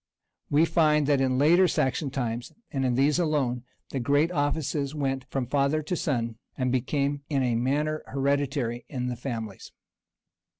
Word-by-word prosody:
[] - - -53
And - - -2
we 155 +3 +6
find 150 -3 +3
that 140 -1 +3
in 130 -1 +2
the - - 0
later 170 +7 +5
Saxon 135 -1 0
times, 120 -3 -3 0.2
and 135 -2 -1
in 125 -1 +1
these 140 +5 +3
alone, 135 -7 0 0.2
the 135 - -3
great 145 +7 +2
offices 145 -2 -1
went 135 -3 -1
from 135 -1 -1
father 140 +4 +1
to 170 +4 -2
sun, 115 -8 -1 0.2
and 130 -1 0
became 140 +3 0
in 140 -3 +1
a 125 -2 +1
manner 145 +6 0
hereditary 135 -3 -1
in 125 -3 -3
the 125 - -3
families. 115 -5 -6
140 Hz, 175 wpm, -27 LUFS, 125-150 Hz, 0.2 s, we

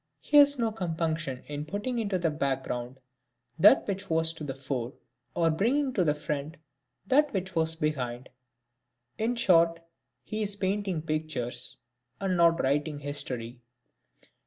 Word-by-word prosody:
He 295 - +2
has 285 -1 +7
no 230 -2 +1
compunction 160 -8 -2
in 145 0 -5
putting 215 +7 -2
into 200 -4 0
the 170 -3 0
background 130 -3 -3 0.6
that - - +7
which 195 -1 -4
was 160 0 +2
to 160 - -8
the 135 -3 -4
fore, 130 -2 -4 0.4
or 165 -1 +3
bringing 255 - +1
to 190 - +2
the 150 -3 +2
front 150 +1 -4 0.5
that 285 +7 +3
which 190 -1 -2
was 160 -1 0
behind. 130 -6 -2 0.9
In 230 +3 +1
short 170 -6 +4 0.4
he 215 0 -4
is 205 -1 -1
painting 195 -4 -1
pictures, 155 -6 -3 0.4
and 190 -2 0
not 170 -1 +4
writing 145 +2 0
history. 130 -4 -5
160 Hz, 140 wpm, -28 LUFS, 145-195 Hz, 0.9 s, has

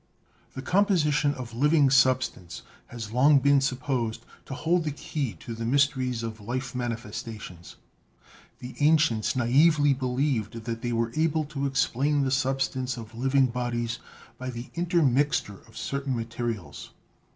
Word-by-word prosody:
The 130 - -6
composition 150 -6 +2
of 120 -2 -8
living 145 +2 +3
sub 130 -1 +5
stance 90 -7 -8 0.2
has 115 -3 -7
long 140 +5 +5
been 140 0 +4
supposed 130 -4 -2 0.2
to 135 - -6
hold 170 +4 +1
the 155 - -1
key 140 -4 -4
to 115 - -6
the 115 0 -6
mys 140 +4 +4
teries 125 -4 -3
of 110 -1 -6
life 125 +4 -4
manifestations. 115 -6 -6 0.8
The 125 +1 -9
ancients 140 -7 +3
naively 145 +4 +4
believed 125 -4 -1
that 115 -1 -4
they 120 - -2
were 115 0 0
able 155 0 +1
to 140 -1 -3
explain 140 +1 +1
the 130 - 0
substance 135 -1 -1
of 115 -1 -9
living 135 +3 +2
bodies 120 -1 -2 0.4
by 130 0 -4
the 120 0 -7
intermixture 145 - +1
of 115 0 -15
certain 140 -1 -2
materials. 115 -9 -5
130 Hz, 145 wpm, -27 LUFS, 115-140 Hz, 0.8 s, sub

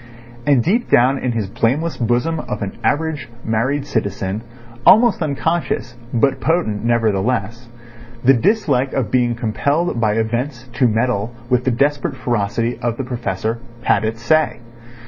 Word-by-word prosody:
And 135 -5 +4
deep 230 +8 +1
down 130 +3 +4
in 125 - -1
his 110 -4 -2
blameless 140 - 0
bosom 125 +7 0
of 115 - -4
an 100 - -3
average 150 -4 -1 0.2
married 130 +6 0
citizen, 100 -5 -2 0.4
almost 225 - +6
unconscious 155 -3 -1 0.2
but 130 +3 +2
potent 120 -7 0
nevertheless, 115 0 0 0.5
the 135 +2 +6
dislike 140 - +1
of 130 -5 -1
being 120 -2 +2
compelled 135 +5 0
by 110 -2 +2
events 120 +3 -2
to 125 - +3
meddle 115 0 0 0.2
with 125 0 +2
the - - +3
desperate 145 +4 0
ferocity 115 -1 -1
of 120 -1 -2
the 135 - -2
Professor 115 -3 -3 0.2
had - - +2
its 115 +1 -3
say. 155 -2 +2
125 Hz, 145 wpm, -19 LUFS, 115-145 Hz, 0.5 s, almost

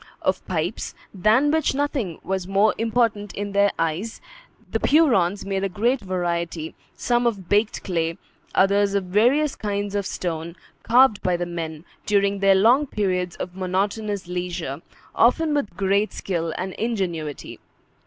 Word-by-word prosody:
Of 190 0 0
pipes, 175 +2 -3 0.2
than 220 +9 +3
which 315 -3 +1
nothing 265 - -1
was 190 0 -2
more 200 +2 +3
important 225 -3 0
in 205 0 -4
their 200 0 +4
eyes, 165 +8 -2 0.5
the - - 0
Hurons 205 - +3
made 195 -1 -2
a 195 - 0
great 235 +8 +1
variety, 170 -4 -3 0.2
some 240 0 +1
of 200 -6 -3
baked 210 +1 +1
clay, 165 -3 -1 0.4
others 200 +1 +3
of 200 - +1
various 245 +11 +2
kinds 205 -1 -3
of 200 -1 -1
stone, 165 -1 -4 0.3
carved 240 -2 +4
by 180 -1 +1
the 175 - -2
men, 165 -2 -6 0.2
during 200 -1 +2
their 195 0 +5
long 240 +9 +4
periods 185 -6 -1
of 180 - -6
monotonous 195 +1 -2
leisure, 175 -5 -4 0.3
often 300 +7 +3
with 250 -12 -2
great 200 +2 +1
skill 165 -3 -2
and 185 0 -4
ingenuity. 175 - -3
195 Hz, 145 wpm, -23 LUFS, 180-220 Hz, 0.5 s, their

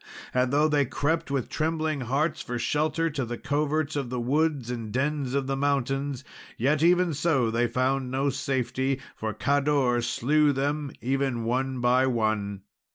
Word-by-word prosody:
And 125 0 +2
though 150 +2 +4
they 145 -2 +2
crept 160 +6 -1
with 135 -3 -1
trembling 155 -2 -1
hearts 150 +6 0
for 120 - -4
shelter 155 +6 0
to 140 -2 -2
the 120 0 -4
coverts 150 +2 -1
of 140 -4 -2
the 125 0 -3
woods 140 0 0
and 115 -3 -5
dens 140 +1 -1
of 140 -1 0
mountains, 140 0 -1 0.3
yet 145 +5 +2
even 175 0 +4
so 135 -6 +1
they 120 +1 +1
found 130 +1 0
no 135 +2 0
safety, 130 0 -1 0.2
for 110 0 -3
Cador 140 -1 +1
slew 145 +5 +2
them, 145 +1 -1
even 130 -1 0
one 130 +2 -1
by 125 +2 +3
one. 110 -5 -1
135 Hz, 160 wpm, -27 LUFS, 125-150 Hz, 0.3 s, though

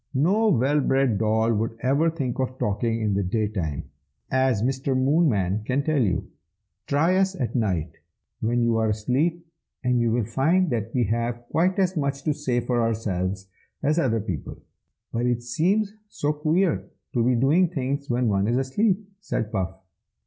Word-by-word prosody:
"No 200 +11 +3
well 145 - +3
bred 135 -6 +2
doll 110 +1 +2
would 115 +1 -2
ever 140 +6 +3
think 135 -7 -3
of 130 0 -2
talking 115 +2 -1
in 105 -2 +1
the 100 - +1
day 105 +3 0
time, 80 -9 -3 0.5
as 130 -5 +2
Mr. 130 +1 0
Moonman 130 - +2
can 130 +5 0
tell 155 -2 +1
you. 100 -6 0 0.6
Try 165 +6 +2
us 190 0 +2
at 125 - -2
night, 90 - -1 0.4
when 120 +2 +1
you 115 -1 +2
are 110 -1 +1
asleep, 140 +11 0 0.4
and 125 -1 +2
you 120 -1 +2
will 115 -1 +1
find 160 - +2
that 115 -1 -2
we 125 - +3
have 115 +2 -1
quite 180 +4 +2
as 190 -1 +1
much 140 -2 -1
to 155 - +1
say 130 -4 -1
for 120 0 0
ourselves 95 -4 -2 0.4
as 155 +4 +2
other 115 -7 +1
people." 95 - -5 0.6
"But 120 +1 0
it 120 -1 0
seems 195 - +1 0.2
so 150 -6 -1
queer 160 +4 0 0.2
to 120 - +2
be 125 +1 +3
doing 145 +9 +4
things 140 -2 -3
when 120 0 +1
one 100 -1 +1
is 120 +2 +1
asleep!" 195 +10 0
said 115 - -3
Puff. 95 -2 -2
125 Hz, 175 wpm, -25 LUFS, 110-150 Hz, 0.6 s, doing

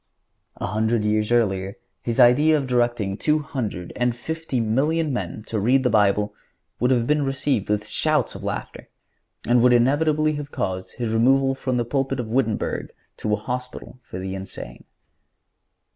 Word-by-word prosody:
A - - -4
hundred 110 +2 0
years 105 +1 +1
earlier 100 -5 +1 0.2
his 120 +1 -2
idea 145 +6 +6
of 140 - -2
directing 120 -6 0
two 150 +5 +2
hundred 125 - -4
and 125 -1 0
fifty 160 0 -3
million 145 +7 +1
men 105 -2 -4
to 110 - -2
read 130 +6 +3
the 125 - +2
Bible 105 -1 +2 0.5
would 125 - +2
have 120 -3 +2
been 150 +2 +2
received 135 -5 -1
with 105 0 0
shouts 155 -5 +1
of - - -9
laughter, - - -5 0.6
and 120 0 +4
would 125 0 +5
inevitably 150 +5 +3
have 145 0 -6
caused 95 0 -3
his 115 -2 -3
removal 135 +4 +3
from 130 -1 -2
the 120 - 0
pulpit 135 +1 -1
of 110 -3 -4
Wittenberg 125 -5 -1 0.3
to 110 - -3
a - - +5
hospital 125 +3 -6
for 90 - -9
the 95 +1 -4
insane." 95 0 -8
120 Hz, 165 wpm, -23 LUFS, 110-135 Hz, 0.6 s, idea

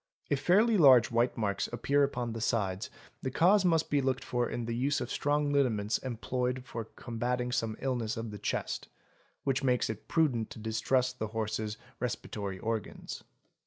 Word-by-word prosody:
If 140 - +2
fairly 210 +9 +4
large 130 -7 +7
white 120 +1 +2
marks 100 -3 0
appear 140 +4 +1
upon 125 -4 -1
the 115 - -5
sides 100 -2 0 0.3
the 130 - -2
cause 185 +9 +4
must 165 -3 +2
be 145 -1 +3
looked 135 0 0
for 120 -1 -1
in 120 - -3
the 115 0 -2
use 140 +4 +1
of - - -4
strong 145 0 +1
liniments 115 -7 +2
employed 125 +1 -2
for 115 -3 -5
combating 125 +2 -3
some 115 -2 -1
illness 120 -5 -1
of 115 -1 -4
the 105 - -7
chest, - - -2 0.6
which 135 0 +1
makes 125 -3 +2
it 110 - -10
prudent 135 -9 +1
to - - -10
distrust 125 +3 0
the 110 - -1
horse's 110 0 -3 0.2
respiratory 105 -5 -3
organs. 110 0 -4
125 Hz, 170 wpm, -31 LUFS, 110-135 Hz, 0.6 s, large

